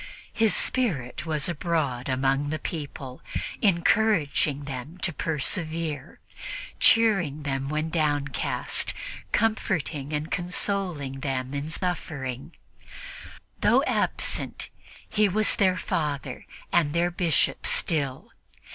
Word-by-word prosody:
His 225 -2 +4
spirit 155 - +1
was 155 -3 +1
abroad 155 -7 -1
among 135 +2 +1
the 155 - -1
people, 140 -5 -6 0.4
encouraging 170 -7 +3
them 140 +4 -6
to 170 - +1
persevere, 155 0 -1 0.6
cheering 195 -11 +4
them 135 -1 -2
when 155 +1 -1
downcast, 145 -4 +1 0.4
comforting 175 -10 0
and 150 +1 -2
consoling 175 -6 -1
them 135 -1 -2
in 140 +2 -3
suffering. 145 -6 -3 1.0
Though - - +4
absent, - - -1 0.4
he 210 -1 +3
was 215 +3 +3
their 185 -2 +3
Father 150 -8 -2 0.3
and 155 -4 +3
their 175 +1 +2
Bishop 170 -4 +1
still. 140 -6 0
155 Hz, 100 wpm, -26 LUFS, 140-180 Hz, 1.0 s, His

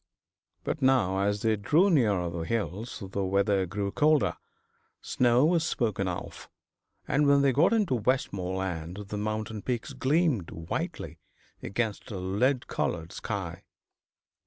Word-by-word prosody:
But 150 - -3
now 125 -8 +3
as 100 +1 0
they 110 -1 +3
drew 155 - +3
nearer 105 - +2
the 85 - -5
hills 105 +4 -3
the 100 0 -1
weather 100 0 +1
grew 100 +2 -3
colder, 150 +3 +3 0.6
snow 125 +2 +3
was 165 0 +3
spoken 105 -10 -1
of, 90 -1 -6 0.6
and 145 +1 +2
when 140 0 +5
they 140 - +4
got 155 +8 +4
into 210 - +2
Westmoreland 95 -7 -2
the 105 - -3
mountain 110 0 -3
peaks 120 0 -3
gleamed 140 - +1
whitely 80 0 -5 0.4
against 110 0 -3
a 100 - -5
lead 105 +9 0
coloured 80 +1 -2
sky. - - -5
110 Hz, 135 wpm, -28 LUFS, 95-135 Hz, 0.6 s, when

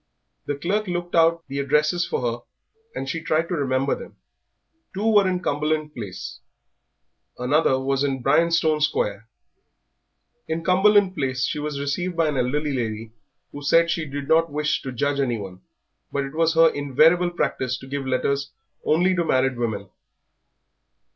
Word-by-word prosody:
The 145 - -1
clerk 195 +9 -1
looked 175 -1 -4
out 165 0 +3
the 140 0 -4
addresses 150 +5 +1
for - - -2
her 120 0 -1 0.6
and 135 - -4
she 165 +4 -3
tried 160 +2 0
to - - -2
remember 135 -3 0
them - - -8 0.8
two 200 +3 -2
were 210 -3 +5
in 180 -1 -1
Cumberland 150 +1 -1
Place, 100 -8 -7 1.0
another 130 +1 +2
was 135 +1 0
in 135 -3 -2
Bryanstone 160 +2 +3
Square. 115 -7 -1 1.2
In 160 +1 -3
Cumberland 195 +1 +4
Place 130 -5 -2
she - - -3
was 150 -1 -4
received 170 +5 -2
by 165 -2 +2
an 145 - -2
elderly 145 +4 0
lady 110 -3 -3 0.4
who 145 - -8
said 165 +4 +3
she 165 - -2
did 140 0 -5
not 165 0 +3
wish 150 +1 0
to 130 - -5
judge 140 +3 -1
anyone, 105 -8 -3 0.5
but 140 - -1
it 135 +1 -7
was 165 +1 +1
her 165 0 +7
invariable 155 +5 +3
practice 130 -7 -2
to - - -12
give 135 0 -4
letters 140 +2 0 0.3
only 180 +4 +2
to 175 - +1
married 130 -4 +1
women. 110 -4 -3
145 Hz, 160 wpm, -23 LUFS, 130-165 Hz, 1.2 s, her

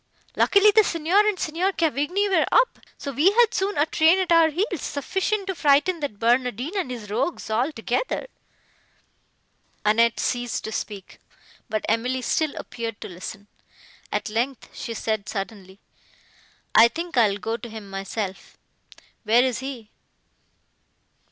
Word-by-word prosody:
Luckily 405 +1 +5
the 435 +1 +6
Signor 335 +2 +1
and 420 -3 0
Signor 350 +5 0
Cavigni 330 - 0
were 385 - +2
up, - - +3 0.2
so 280 - -5
we 295 +8 +4
had 460 0 +4
soon 395 +2 -1
a 290 - +4
train 320 +3 +4
at 370 -2 -1
our 330 -1 +6
heels, 360 +2 -2
sufficient 385 +8 -2
to 380 - -2
frighten 315 +3 +3
that 285 -9 -4
Barnardine 250 - 0
and 375 -10 -1
his 225 -5 -7
rogues, 220 +2 -2
all 245 +8 +1
together." 245 - -2 1.6
Annette 230 +2 +3
ceased 245 -1 -2
to 220 - -5
speak, 205 -3 -6 0.5
but 215 -1 -2
Emily 250 +3 0
still 310 +4 0
appeared 230 -3 -6
to - - -6
listen. 190 +3 -8 0.7
At - - -2
length 235 +4 -2
she 230 - -5
said, 215 -2 -2
suddenly, 195 -2 -6 0.9
"I 225 +2 +8
think 335 +7 -6
I 230 -4 +5
will 200 - -3
go 225 +3 -3
to 235 0 -9
him 215 -2 -9
myself;—where 195 +3 -3
is 255 -3 0
he?" 260 -5 -7
255 Hz, 145 wpm, -24 LUFS, 220-340 Hz, 1.6 s, I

